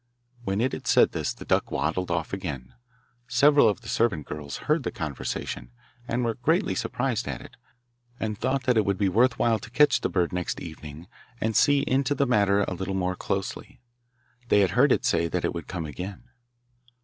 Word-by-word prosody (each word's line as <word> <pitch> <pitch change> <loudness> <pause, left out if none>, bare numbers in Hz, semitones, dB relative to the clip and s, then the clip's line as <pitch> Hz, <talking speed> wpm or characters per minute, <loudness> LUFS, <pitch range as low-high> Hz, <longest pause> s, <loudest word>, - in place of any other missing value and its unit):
When 100 -1 -1
it 130 +1 +1
had - - -6
said - - +5
this - - -2
the - - -10
duck - - +1
waddled 90 0 -1
off 85 0 -2
again. 70 -10 -5 0.5
Several 140 +1 +5
of 105 - -3
the 115 - -12
servant 105 -13 0
girls 75 -2 -6
heard 155 +1 +2
the - - -2
conversation, 65 -5 -5 0.4
and 120 +1 -1
were 115 - 0
greatly 160 - +1
surprised 125 -3 -2
at - - -4
it, - - -13 0.6
and 110 -1 -2
thought 130 +5 -1
that 125 -3 +2
it 110 - +4
would 100 -1 0
be 100 -1 +2
worth 125 +6 +3
while 115 -2 +2
to 105 - -10
catch 150 +4 +4
the - - 0
bird 90 -1 0
next 90 -1 -2
evening 80 -1 -9 0.3
and 110 0 -1
see 145 -1 +4
into 135 +2 +1
the 140 - +2
matter 100 -5 +3
a - - -3
little 95 +2 -4
more 90 -1 -1
closely. 95 +2 -4 0.7
They 105 - +4
had 95 -3 +2
heard 130 +8 +4
it 135 - +2
say 85 -9 +2
that 90 +1 -2
it - - -1
would 85 -3 -6
come 90 -3 -4
again. 90 +8 -7
100 Hz, 200 wpm, -26 LUFS, 90-125 Hz, 0.7 s, said